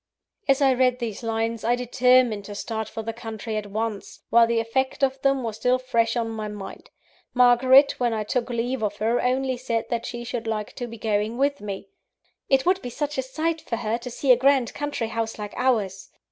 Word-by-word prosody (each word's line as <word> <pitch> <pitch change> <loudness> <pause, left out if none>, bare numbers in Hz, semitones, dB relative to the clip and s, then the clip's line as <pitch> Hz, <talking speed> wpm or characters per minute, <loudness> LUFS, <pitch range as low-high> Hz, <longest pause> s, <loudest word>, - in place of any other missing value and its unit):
As 275 +1 +3
I 265 -1 +5
read 250 -1 +2
these 230 -5 -4
lines, 225 0 -2
I 235 +2 +2
determined 250 -3 +3
to 205 - -8
start 220 +1 -4
for 225 - -6
the 225 +1 -4
country 225 -1 -6
at 210 -1 -3
once, 215 0 -4
while 235 0 +6
the 230 0 +1
effect 260 +5 -1
of 265 0 +1
them 275 -2 +2
was 220 -2 -4
still 250 +3 +2
fresh 235 -2 0
on 230 -1 0
my 215 -1 -4
mind. 205 -2 -9 0.5
Margaret, 255 +3 +6
when 245 -2 +1
I 220 -1 -1
took 240 +3 -2
leave 245 +2 -2
of 205 -1 -2
her, 225 +3 +1
only 260 +1 0
said 230 -2 -2
that 235 -1 -1
she 240 0 -5
should 240 -1 -4
like 215 -2 -3
to 245 - -4
be 230 0 -9
going 215 +1 -1
with 280 +1 +1
me 200 -1 -6 0.6
"it 270 -1 +3
would 370 +1 +2
be 245 - -5
such 295 +2 -3
a - - +3
sight 315 +5 -2
for 230 - -3
her, 225 0 -2
to 250 - -7
see 260 +2 +1
a - - +9
grand 265 -1 +2
country 290 -6 -3
house 225 0 -3
like 210 -1 -6
ours!" 210 -7 0
235 Hz, 215 wpm, -24 LUFS, 220-255 Hz, 0.6 s, a